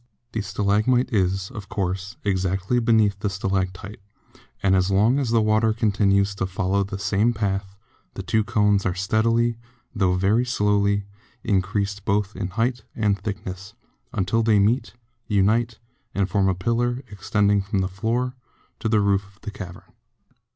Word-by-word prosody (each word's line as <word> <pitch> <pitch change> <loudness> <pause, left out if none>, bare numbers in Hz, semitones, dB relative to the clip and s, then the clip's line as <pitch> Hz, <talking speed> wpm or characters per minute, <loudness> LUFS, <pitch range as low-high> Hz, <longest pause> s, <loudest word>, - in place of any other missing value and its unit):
The 110 - -2
stalagmite 105 +6 +1
is, 95 -1 0
of 105 -6 -9
course, 95 0 -3
exactly 95 +3 0
beneath 110 -4 +3
the 100 - -1
stalactite, 95 +1 -3 0.6
and 95 -1 +4
as 95 0 +2
long 110 +8 +3
as 135 -4 -1
the 115 -1 +3
water 110 +1 +3
continues 100 -3 +2
to 95 -1 -2
follow 95 +1 0
the 95 0 -5
same 105 +4 +1
path 100 -2 -2 0.4
the - - -5
two 110 -1 +1
cones 105 -3 +2
are 90 - -1
steadily, 115 +4 +1 0.3
tho 95 -5 +2
very 100 +6 +2
slowly, 100 -4 +1 0.4
increased 100 +1 -1
both 105 0 0
in 95 - -3
height 115 +6 -1
and 105 -3 +1
thickness, 95 -1 -6 0.4
until 100 +4 0
they 110 -2 +3
meet, 110 +6 +1 0.3
unite, 110 +3 +2 0.4
and 100 -1 +1
form 100 -2 +2
a 95 - +1
pillar 120 +6 -1
extending 100 0 +1
from 95 -1 -1
floor 115 +7 -1 0.5
to 110 - -1
roof 100 -1 +2
of - - -30
the 105 - -6
cavern. 90 -3 -9
100 Hz, 150 wpm, -23 LUFS, 95-110 Hz, 0.6 s, and